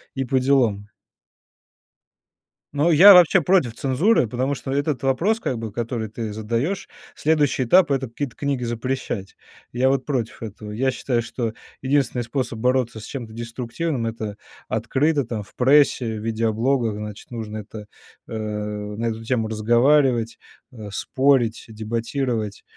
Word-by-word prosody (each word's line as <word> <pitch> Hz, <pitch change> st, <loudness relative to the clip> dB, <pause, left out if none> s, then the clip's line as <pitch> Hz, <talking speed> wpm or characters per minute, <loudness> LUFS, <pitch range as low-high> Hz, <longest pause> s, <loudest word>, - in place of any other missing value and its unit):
и 135 Hz, -, -1 dB
поделом. 125 Hz, -6 st, +1 dB, 1.9 s
Но 150 Hz, +4 st, +2 dB
я 190 Hz, +6 st, +10 dB
вообще 180 Hz, +1 st, +7 dB
против 165 Hz, -8 st, +2 dB
цензуры, 140 Hz, -, +2 dB
потому 130 Hz, +5 st, -1 dB
что 135 Hz, -1 st, -5 dB
этот 145 Hz, 0 st, -1 dB
вопрос, 170 Hz, +12 st, +1 dB
как 130 Hz, -, -2 dB
бы, 110 Hz, -2 st, -5 dB
который 115 Hz, -1 st, -3 dB
ты 110 Hz, -1 st, -5 dB
задаешь, 115 Hz, -, -2 dB, 0.3 s
следующий 150 Hz, -4 st, +1 dB
этап- 165 Hz, +6 st, +4 dB
это 135 Hz, -2 st, 0 dB
какие-то 130 Hz, +2 st, -5 dB
книги 140 Hz, -3 st, -2 dB
запрещать. 120 Hz, -4 st, -4 dB, 0.3 s
Я 125 Hz, +2 st, +1 dB
вот 135 Hz, -1 st, 0 dB
против 120 Hz, -5 st, -3 dB
этого. 105 Hz, 0 st, -8 dB
Я 130 Hz, +5 st, 0 dB
считаю, 125 Hz, -2 st, -1 dB
что 115 Hz, -1 st, -4 dB, 0.3 s
единственный 130 Hz, -2 st, +1 dB
способ 120 Hz, -2 st, -3 dB
бороться 125 Hz, -2 st, 0 dB
с -, -, -10 dB
чем-то 120 Hz, -5 st, -7 dB
деструктивным- 120 Hz, +4 st, -3 dB
это 110 Hz, -2 st, -4 dB, 0.3 s
открыто, 145 Hz, +1 st, +1 dB
там, 110 Hz, -3 st, -4 dB
в -, -, -21 dB
прессе, 125 Hz, -4 st, +3 dB
в -, -, -8 dB
видеоблогах, 115 Hz, +1 st, 0 dB
значит, 105 Hz, +2 st, -8 dB
нужно 110 Hz, -2 st, -5 dB
это, 105 Hz, 0 st, -9 dB, 0.4 s
а, -, -, -9 dB, 0.6 s
на 115 Hz, +2 st, -3 dB
эту 115 Hz, 0 st, -3 dB
тему 115 Hz, -2 st, 0 dB
разговаривать, 120 Hz, +2 st, +2 dB, 0.4 s
а, 110 Hz, -3 st, -8 dB
спорить, 130 Hz, +1 st, +1 dB
дебатировать. 115 Hz, 0 st, -3 dB
120 Hz, 140 wpm, -22 LUFS, 110-135 Hz, 1.9 s, я